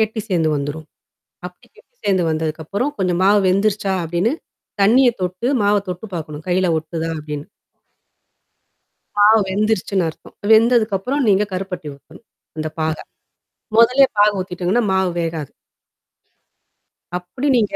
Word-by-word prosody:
கெட்டி 220 Hz, 0 st, 0 dB
சேர்ந்து 165 Hz, -4 st, +1 dB
வந்துரும். 145 Hz, +2 st, -5 dB, 0.6 s
அப்படி -, -, -11 dB
கெட்டி -, -, -23 dB
சேர்ந்து 190 Hz, -3 st, +2 dB
வந்ததுக்கப்புறம் 160 Hz, -, -2 dB
கொஞ்சம் 180 Hz, -1 st, 0 dB
மாவு 205 Hz, +1 st, +5 dB
வெந்துருச்சா? 200 Hz, +1 st, +1 dB
அப்டின்னு. 175 Hz, -, 0 dB, 0.5 s
தண்ணிய 245 Hz, +5 st, +5 dB
தொட்டு, 185 Hz, +6 st, -2 dB, 0.2 s
மாவ 205 Hz, +1 st, +3 dB
தொட்டு 180 Hz, +3 st, -5 dB
பார்க்கணும். 155 Hz, -1 st, -7 dB
கையில 185 Hz, 0 st, +2 dB
ஒட்டுதா 160 Hz, +1 st, -4 dB
அப்டின்னு. 150 Hz, -1 st, -6 dB, 1.7 s
மாவு 215 Hz, +2 st, +6 dB
வெந்துருச்சுன்னு 200 Hz, -2 st, 0 dB
அர்த்தம். -, -, -14 dB, 0.2 s
வெந்ததுக்கப்புறம் 230 Hz, +3 st, +3 dB
நீங்க 200 Hz, +1 st, +4 dB
கருப்பட்டிய 180 Hz, -6 st, -5 dB
ஊத்தணும். 170 Hz, +10 st, -19 dB, 0.3 s
அந்த 155 Hz, 0 st, -2 dB
பாக. 155 Hz, 0 st, 0 dB, 0.8 s
மொதல்லே 250 Hz, +4 st, +6 dB
பாக 205 Hz, 0 st, +5 dB
ஊத்திட்டோங்கன்னா, 185 Hz, +5 st, -1 dB
மாவு 190 Hz, -1 st, +1 dB
வேகாது. 160 Hz, -4 st, -4 dB, 1.6 s
அப்படி 215 Hz, +11 st, -5 dB
நீங்க 210 Hz, -3 st, 0 dB
190 Hz, 120 wpm, -19 LUFS, 165-215 Hz, 1.7 s, மாவு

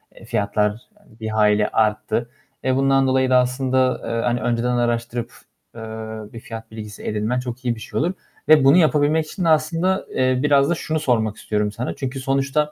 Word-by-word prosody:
eee, -, -, -14 dB
fiyatlar, 105 Hz, +2 st, 0 dB
hani, 200 Hz, -, -23 dB
bir 110 Hz, -1 st, -4 dB
hayli 105 Hz, -1 st, +3 dB
arttı. 110 Hz, +2 st, 0 dB, 0.3 s
Eee, 130 Hz, 0 st, +1 dB
bundan 135 Hz, 0 st, +3 dB
dolayı 130 Hz, 0 st, +2 dB
da 130 Hz, -, +5 dB
aslında, 130 Hz, 0 st, +1 dB
eee, 115 Hz, 0 st, -1 dB
hani, 120 Hz, 0 st, 0 dB
önceden 120 Hz, +1 st, 0 dB
araştırıp, 120 Hz, 0 st, -1 dB, 0.4 s
eee, 115 Hz, -, -8 dB, 0.5 s
bir 115 Hz, -, -7 dB
fiyat 115 Hz, -1 st, -9 dB
bilgisi 105 Hz, -1 st, -9 dB
edinmen 110 Hz, +4 st, -1 dB
çok 125 Hz, 0 st, -7 dB
iyi 120 Hz, -1 st, +1 dB
bir -, -, -11 dB
şey -, -, -4 dB
olur. 170 Hz, +5 st, 0 dB, 0.4 s
Ve 155 Hz, -3 st, +7 dB
bunu 135 Hz, +5 st, +6 dB
yapabilmek 155 Hz, -1 st, +3 dB
için 180 Hz, +4 st, -5 dB
de -, -, +3 dB
aslında, 165 Hz, +5 st, +1 dB
eee, 130 Hz, -1 st, +2 dB
biraz 140 Hz, -1 st, +4 dB
da 175 Hz, -, +2 dB
şunu 160 Hz, 0 st, -2 dB
sormak 110 Hz, -7 st, 0 dB
istiyorum 105 Hz, -1 st, -1 dB
sana. 115 Hz, +4 st, -4 dB
Çünkü 135 Hz, 0 st, -4 dB
sonuçta, 135 Hz, +3 st, 0 dB
125 Hz, 190 wpm, -21 LUFS, 115-140 Hz, 0.5 s, Ve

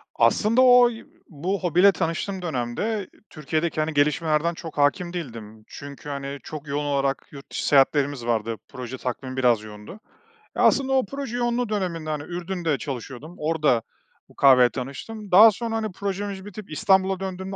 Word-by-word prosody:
Aslında 225 Hz, +4 st, +3 dB
oy 245 Hz, -2 st, +5 dB, 0.2 s
bu 180 Hz, +6 st, -3 dB
hobiyle 180 Hz, +4 st, +5 dB
tanıştığım 180 Hz, +2 st, -3 dB
dönemde 175 Hz, -, -2 dB, 0.2 s
Türkiye'deki, 155 Hz, +1 st, -2 dB
hani, 155 Hz, 0 st, -2 dB
gelişmelerden 150 Hz, +3 st, +1 dB
çok 165 Hz, -2 st, -9 dB
hâkim 175 Hz, +5 st, +1 dB
değildim. 115 Hz, -9 st, -7 dB
Çünkü, 140 Hz, +1 st, -10 dB
hani, 140 Hz, 0 st, -5 dB
çok 150 Hz, -1 st, -8 dB
yoğun 145 Hz, +1 st, -2 dB
olarak 140 Hz, -1 st, -1 dB
yurt 140 Hz, -1 st, -12 dB
dışı -, -, -3 dB
seyahatlerimiz 140 Hz, -2 st, +3 dB
vardı. 115 Hz, -1 st, -1 dB
Proje 125 Hz, 0 st, -7 dB
takvimi 130 Hz, +1 st, -5 dB
biraz 120 Hz, -4 st, +3 dB
yoğundu. 105 Hz, -1 st, -11 dB
Eee, 450 Hz, -, -11 dB
aslında 270 Hz, -1 st, +3 dB
o 260 Hz, -4 st, +3 dB
proje 275 Hz, -1 st, -5 dB
yoğunluğu 240 Hz, -1 st, 0 dB
döneminde, 175 Hz, -7 st, -3 dB
hani, 150 Hz, -1 st, -3 dB
Ürdün'de 175 Hz, -3 st, -3 dB
çalışıyordum, 140 Hz, +4 st, -7 dB
orada 150 Hz, -6 st, +1 dB, 0.5 s
bu -, -, -20 dB
kahveyle 130 Hz, -3 st, +6 dB
tanıştım. 185 Hz, -, -7 dB
Daha 215 Hz, +5 st, +9 dB
sonra, 225 Hz, +2 st, -4 dB
hani, 220 Hz, -2 st, -2 dB
projemiz 200 Hz, 0 st, -4 dB
bitip 205 Hz, -2 st, -10 dB
İstanbul'a 190 Hz, +3 st, +2 dB
döndüğümde 190 Hz, 0 st, -5 dB
165 Hz, 155 wpm, -24 LUFS, 140-200 Hz, 0.5 s, Daha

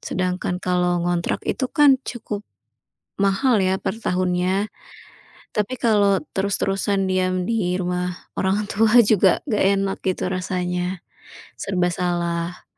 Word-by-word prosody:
Sedangkan 180 Hz, -1 st, -2 dB
kalau 180 Hz, -1 st, 0 dB
ngontrak 175 Hz, -1 st, -1 dB
itu 260 Hz, -2 st, -1 dB
kan 285 Hz, -4 st, +5 dB
cukup 215 Hz, -4 st, -5 dB, 0.8 s
mahal 200 Hz, +5 st, +3 dB
ya, 190 Hz, 0 st, +2 dB
per 210 Hz, -, -2 dB
tahunnya. 185 Hz, +1 st, 0 dB, 0.9 s
Tapi 210 Hz, +4 st, 0 dB
kalau 205 Hz, -4 st, +3 dB, 0.2 s
terus-terusan 195 Hz, 0 st, 0 dB
diam 185 Hz, 0 st, 0 dB
di 200 Hz, -6 st, 0 dB
rumah 180 Hz, 0 st, -2 dB, 0.2 s
orang 200 Hz, +2 st, 0 dB
tua 225 Hz, +3 st, +4 dB
juga 210 Hz, -3 st, +4 dB
nggak 215 Hz, -6 st, +1 dB, 0.2 s
enak, 195 Hz, 0 st, -1 dB
gitu, 185 Hz, -1 st, -1 dB
rasanya. 180 Hz, 0 st, -2 dB, 0.6 s
Serba 180 Hz, -2 st, 0 dB
salah. 170 Hz, 0 st, -2 dB
185 Hz, 115 wpm, -22 LUFS, 180-205 Hz, 0.9 s, kan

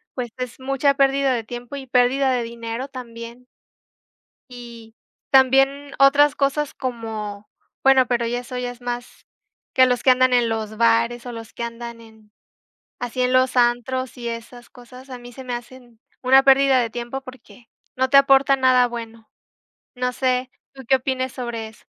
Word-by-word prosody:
pues, 250 Hz, -2 st, -4 dB
es 250 Hz, -1 st, -6 dB
mucha 275 Hz, +1 st, +1 dB
pérdida 275 Hz, 0 st, +2 dB
de 235 Hz, -2 st, -2 dB
tiempo 240 Hz, +4 st, -8 dB
y 275 Hz, -1 st, -7 dB
pérdida 260 Hz, +2 st, +2 dB
de 250 Hz, -1 st, 0 dB
dinero 230 Hz, +2 st, -6 dB
también. 235 Hz, -2 st, -10 dB, 1.0 s
Y 235 Hz, -2 st, -12 dB, 0.4 s
también 270 Hz, +2 st, +3 dB
otras 280 Hz, +1 st, +5 dB
cosas 280 Hz, +1 st, -1 dB
como 220 Hz, -4 st, -6 dB, 0.3 s
bueno, 265 Hz, -2 st, +5 dB
pero 240 Hz, -1 st, 0 dB
ya 240 Hz, +1 st, -2 dB
eso 250 Hz, +1 st, -7 dB
ya 250 Hz, 0 st, -3 dB
es 245 Hz, 0 st, -15 dB
más 245 Hz, 0 st, -6 dB, 0.5 s
que 260 Hz, -, +6 dB
los 250 Hz, -1 st, 0 dB
que -, -, +4 dB
andan 255 Hz, 0 st, +3 dB
en 240 Hz, -2 st, +3 dB
los 220 Hz, -1 st, -4 dB
bares 230 Hz, +1 st, +2 dB
o 245 Hz, -, -6 dB
los 225 Hz, -1 st, -10 dB
que 235 Hz, -, -6 dB
andan 235 Hz, 0 st, -7 dB
en 220 Hz, -2 st, -19 dB, 0.7 s
así 245 Hz, +1 st, -3 dB
en 250 Hz, 0 st, +1 dB
los 255 Hz, 0 st, +2 dB
antros, 245 Hz, +2 st, 0 dB
y 240 Hz, -1 st, -5 dB
esas 235 Hz, +1 st, -8 dB
cosas, 250 Hz, +2 st, -15 dB
a 250 Hz, -, -7 dB
mí 245 Hz, 0 st, -12 dB
se 260 Hz, +2 st, -10 dB
me 250 Hz, -, -5 dB
hacen 240 Hz, -1 st, -11 dB, 0.2 s
una 265 Hz, +1 st, +6 dB
pérdida 270 Hz, -1 st, +5 dB
de 230 Hz, -2 st, -2 dB
tiempo, 240 Hz, +3 st, -5 dB
porque 255 Hz, -2 st, -15 dB, 0.3 s
no 260 Hz, +1 st, +1 dB
te 275 Hz, -, +4 dB
aporta 275 Hz, 0 st, +5 dB
nada 255 Hz, -1 st, +4 dB
bueno. 230 Hz, -2 st, -9 dB, 0.7 s
No 250 Hz, 0 st, -1 dB
sé, 255 Hz, 0 st, -1 dB, 0.2 s
¿tú 270 Hz, -1 st, -11 dB
qué 265 Hz, -, +5 dB
opines 260 Hz, 0 st, -3 dB
sobre 235 Hz, -3 st, -5 dB
eso? 220 Hz, -, -21 dB
250 Hz, 175 wpm, -21 LUFS, 235-260 Hz, 1.0 s, que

